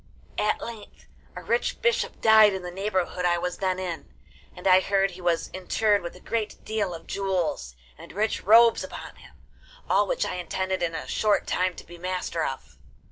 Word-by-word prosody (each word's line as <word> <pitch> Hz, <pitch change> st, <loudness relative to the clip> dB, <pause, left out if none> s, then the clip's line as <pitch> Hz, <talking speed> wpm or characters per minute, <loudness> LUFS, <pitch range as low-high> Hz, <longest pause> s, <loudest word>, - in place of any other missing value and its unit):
At 210 Hz, -, +1 dB
length 225 Hz, -3 st, -9 dB, 0.3 s
a -, -, -7 dB
rich 475 Hz, -, 0 dB
bishop 480 Hz, -1 st, 0 dB
died 220 Hz, -2 st, +7 dB
in 190 Hz, -1 st, -4 dB
the 180 Hz, -, -6 dB
neighbourhood 185 Hz, -1 st, -2 dB
I 175 Hz, -1 st, +3 dB
was 180 Hz, +1 st, -3 dB
then 185 Hz, -1 st, 0 dB
in, 180 Hz, -3 st, -5 dB, 0.4 s
and 180 Hz, -, -12 dB
I 185 Hz, -1 st, +7 dB
heard 195 Hz, 0 st, +1 dB
he 180 Hz, +1 st, -11 dB
was 175 Hz, -2 st, 0 dB
interred 205 Hz, +3 st, +1 dB
with 170 Hz, 0 st, -7 dB
a -, -, -13 dB
great 220 Hz, +2 st, -4 dB
deal 205 Hz, -5 st, -2 dB
of 165 Hz, -, -11 dB
jewels 180 Hz, -, -2 dB, 0.2 s
and -, -, -11 dB
rich 215 Hz, +3 st, -1 dB
robes 230 Hz, +3 st, +6 dB
upon -, -, -9 dB
him, -, -, -17 dB, 0.5 s
all -, -, +3 dB
which -, -, 0 dB
I -, -, -3 dB
intended 185 Hz, +1 st, -2 dB
in 165 Hz, -1 st, -1 dB
a -, -, -5 dB
short 210 Hz, -1 st, +1 dB
time 185 Hz, -1 st, 0 dB
to -, -, -11 dB
be 175 Hz, +1 st, -12 dB
master 180 Hz, -2 st, -2 dB
of. 135 Hz, -, -6 dB
185 Hz, 190 wpm, -26 LUFS, 175-210 Hz, 0.5 s, died